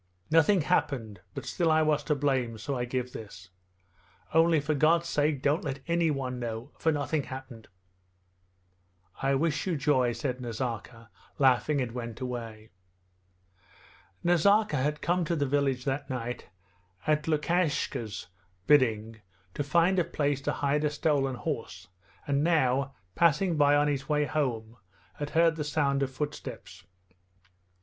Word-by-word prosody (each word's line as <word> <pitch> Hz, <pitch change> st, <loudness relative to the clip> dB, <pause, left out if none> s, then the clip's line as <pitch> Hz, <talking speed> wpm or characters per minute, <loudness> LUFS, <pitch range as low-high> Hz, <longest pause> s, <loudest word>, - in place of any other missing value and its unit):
'Nothing 165 Hz, +4 st, +5 dB
happened, 115 Hz, -, -1 dB
but -, -, -5 dB
still 170 Hz, -2 st, 0 dB
I 155 Hz, 0 st, +4 dB
was 150 Hz, -1 st, +1 dB
to 150 Hz, -, +1 dB
blame, 130 Hz, -5 st, 0 dB
so 135 Hz, +6 st, -4 dB
I 120 Hz, -1 st, -1 dB
give 125 Hz, 0 st, -3 dB
this! 100 Hz, -4 st, -10 dB, 0.8 s
Only 165 Hz, 0 st, +5 dB
for 150 Hz, +2 st, -1 dB
God's 165 Hz, +4 st, +3 dB
sake 150 Hz, -3 st, 0 dB
don't 150 Hz, +7 st, +2 dB
let 135 Hz, -1 st, -4 dB
anyone 145 Hz, -7 st, 0 dB
know, 115 Hz, +2 st, -5 dB
for 160 Hz, -, +2 dB
nothing 145 Hz, -1 st, -1 dB
happened...' 130 Hz, -4 st, -9 dB, 1.5 s
'I 135 Hz, 0 st, +2 dB
wish 155 Hz, +4 st, 0 dB
you 175 Hz, -4 st, 0 dB
joy,' 130 Hz, -4 st, +2 dB
said 130 Hz, -1 st, -3 dB
Nazarka 115 Hz, -1 st, -5 dB, 0.3 s
laughing, 135 Hz, +2 st, +3 dB
and 125 Hz, -2 st, -3 dB
went 115 Hz, -2 st, -6 dB
away. 115 Hz, -4 st, -6 dB, 1.5 s
Nazarka 175 Hz, +1 st, +3 dB
had 150 Hz, +3 st, -1 dB
come 175 Hz, +2 st, +1 dB
to 170 Hz, +1 st, -1 dB
the 145 Hz, -3 st, 0 dB
village 135 Hz, -2 st, 0 dB
that 140 Hz, +1 st, -2 dB
night 125 Hz, -5 st, -5 dB, 0.6 s
at 150 Hz, 0 st, +1 dB
Lukashka's 150 Hz, -, -1 dB, 0.4 s
bidding 115 Hz, -5 st, +2 dB, 0.3 s
to 145 Hz, -, -2 dB
find 170 Hz, +6 st, +3 dB
a -, -, +3 dB
place 145 Hz, -3 st, -1 dB
to 145 Hz, -, -1 dB
hide 145 Hz, +1 st, 0 dB
a 150 Hz, -, +2 dB
stolen 145 Hz, -3 st, 0 dB
horse, 115 Hz, -, -5 dB, 0.4 s
and 140 Hz, 0 st, +1 dB
now, 140 Hz, -4 st, +2 dB, 0.2 s
passing 170 Hz, +2 st, +3 dB
by 145 Hz, -1 st, +4 dB
on 145 Hz, 0 st, +3 dB
his 140 Hz, -1 st, -2 dB
way 150 Hz, -1 st, +2 dB
home, 120 Hz, -6 st, -2 dB, 0.4 s
had 145 Hz, 0 st, -3 dB
heard 165 Hz, -1 st, +4 dB
the 150 Hz, -, -2 dB
sound 145 Hz, -2 st, 0 dB
of 135 Hz, -, 0 dB
footsteps. 145 Hz, +3 st, -6 dB
140 Hz, 145 wpm, -29 LUFS, 125-155 Hz, 1.5 s, Nothing